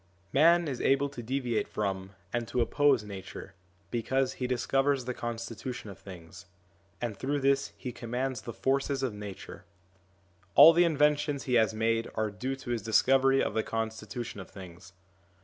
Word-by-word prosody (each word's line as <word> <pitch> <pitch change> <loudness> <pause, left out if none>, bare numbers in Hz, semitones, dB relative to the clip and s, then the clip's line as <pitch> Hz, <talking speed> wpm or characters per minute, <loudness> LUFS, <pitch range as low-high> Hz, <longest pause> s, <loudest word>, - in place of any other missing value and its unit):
Man 170 +4 +5
is 130 -4 -3
able 140 +1 +2
to 135 -4 -8
deviate 125 -1 -1
from 95 -2 -3 0.2
and 120 -1 -1
to 125 - -2
oppose 130 +1 +3
Nature, 100 -3 -9 0.4
because 130 +3 0
he 125 - 0
discovers 135 +2 +1
the 125 - -2
constitution 115 -1 -5
of 95 - -13
things, 85 -1 -12 0.5
and 120 -4 -3
through 140 +7 -2
this 135 0 +2
he 125 - -5
commands 125 +1 -3
the 120 - -6
forces 135 +2 0
of 125 -5 -1
Nature; 105 -2 -9 0.9
all 165 - +10
the 175 +1 +5
inventions 150 -2 +2
he 125 - -2
has 110 -2 +3
made 115 +1 0
are 110 -1 -1
due 130 +6 -3
to 130 -2 -7
his 120 -2 -1
dis 110 +1 +3
covery 135 0 +4
of - - -2
the 110 - +1
constitution 110 0 -4
of 95 - -9
things. 95 0 -12
120 Hz, 165 wpm, -29 LUFS, 110-135 Hz, 0.9 s, all